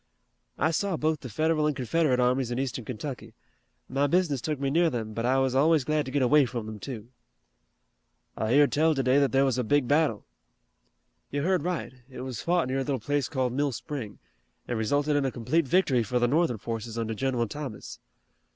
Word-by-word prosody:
"I 160 +3 +2
saw 190 +1 -1
both 155 0 0
the 125 - -8
Federal 155 +6 +1
and 150 - 0
Confederate 130 +1 +1
armies 125 0 +2
in 120 - -3
Eastern 130 -3 -3
Kentucky. 125 +2 -6 0.5
My 140 +2 +1
business 150 -5 +1
took 150 0 -3
me 135 -1 -1
near 170 +2 +3
them, 110 -5 -4
but 115 +2 -2
I 130 +1 +3
was 135 -1 +1
always 150 +2 +4
glad 150 +2 0
to 130 - -6
get 140 -1 +1
away 140 +1 +5
from 120 -2 -5
them, 110 -1 -7
too." 115 -2 -7 1.3
"I 110 +3 0
heard 145 0 +5
tell 160 +1 +3
today 135 0 +3
that 140 -4 +2
there 135 +2 +3
was 130 -2 0
a - - +1
big 140 +2 +2
battle." 145 -6 +1 1.0
"You 140 0 -2
heard 185 0 +2
right. 175 -4 -3 0.2
It 130 - -8
was 130 -4 -5
fought 175 -4 +1
near 130 +1 -1
a - - 0
little 135 -2 -2
place 145 +4 -1
called 130 -4 -1
Mill 140 +1 0
Spring, 120 -5 -6 0.5
and 120 - -2
resulted 145 +7 +1
in 145 - +2
a 135 - +1
complete 130 +7 0
victory 150 -7 +3
for 115 +3 -1
the 120 0 +3
Northern 145 -2 +1
forces 115 +1 -5
under 115 -1 -2
General 125 0 -1
Thomas." 135 -3 -7
135 Hz, 205 wpm, -27 LUFS, 120-150 Hz, 1.3 s, away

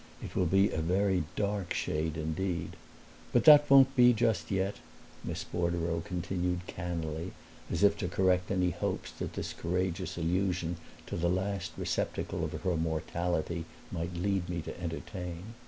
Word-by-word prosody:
It - - -7
will 90 - +2
be 95 +3 +4
a 80 - -1
very 90 0 +2
dark 100 -3 -1
shade 80 +1 -1
indeed. 85 +3 -2 0.6
But - - +3
that 150 -1 +9
won't 135 -1 +7
be 125 -1 +7
just 115 -1 +1
yet," 95 0 0 0.5
Miss - - -4
Bordereau 85 -1 -1
continued 90 0 -2
cannily, 85 -1 -4 0.4
as - - 0
if 100 0 +6
to 90 - -1
correct 90 0 +2
any 90 -2 +2
hopes 80 -6 -3
that - - -4
this - - -4
courageous 90 +1 -2
allusion 90 0 0 0.3
to - - -5
the 85 +1 +1
last 95 0 -1
receptacle - - -2
of - - -3
her 90 -2 -1
mortality 85 +1 -1 0.3
might 85 +1 -3
lead 95 0 0
me 85 -2 -2
to 85 - -7
entertain. 90 +3 -5
90 Hz, 155 wpm, -31 LUFS, 85-95 Hz, 0.6 s, that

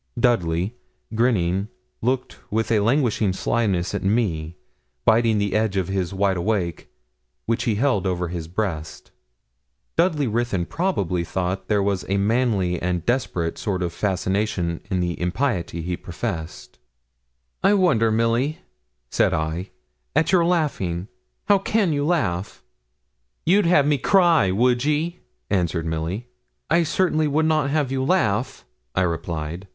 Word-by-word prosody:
Dudley, 95 -4 +1 0.4
grinning, 100 -5 +1 0.3
looked 125 +2 -1
with 110 +2 0
a 110 - +4
languishing 115 -3 +2
slyness 95 -3 0
at - - -2
me, 90 -6 0 0.5
biting 115 -1 +4
the 100 -2 0
edge 110 -2 +1
of 95 -2 -1
his 95 -3 -1
wide 95 -1 +1
awake, 85 -3 -2 0.6
which 115 +2 0
he 115 -4 +1
held 105 -5 +1
over 90 -2 -1
his 85 -2 -5
breast. 85 -4 -4 0.8
Dudley 160 -5 +2
Ruthyn 115 -6 0
probably 95 - -1
thought 90 +2 -3
there 105 -2 +2
was 100 -2 0
a 100 - +2
manly 100 -4 +1
and 90 -1 -1
desperate 90 -9 -1
sort 95 -4 -1
of 85 -1 -3
fascination 95 -2 -1
in 95 -3 0
the 85 -1 -2
impiety 90 -3 -1
he 90 +1 -2
professed. 85 - -6 0.8
'I 205 - +4
wonder, 145 - +3
Milly,' 115 +7 +1 0.5
said - - +2
I, 80 +4 -3 0.5
'at 160 +3 +3
your 175 -3 +4
laughing. 110 - 0 0.4
How 200 -2 +4
can 195 -3 +1
you 145 -1 0
laugh?' 100 - -1 0.8
'You'd 190 +2 +4
have 150 -5 +5
me 145 -1 +2
cry, 170 - +4
would 120 +5 +2
ye?' 155 +4 0 0.3
answered 85 -4 0
Milly. 80 +8 -3 0.4
'I 170 +2 +5
certainly 155 -2 +1
would 155 +2 +1
not 155 -3 +2
have 145 -3 0
you 130 -1 0
laugh,' 130 - 0 0.3
I - - +2
replied. 85 +1 -3
105 Hz, 140 wpm, -23 LUFS, 90-130 Hz, 0.8 s, have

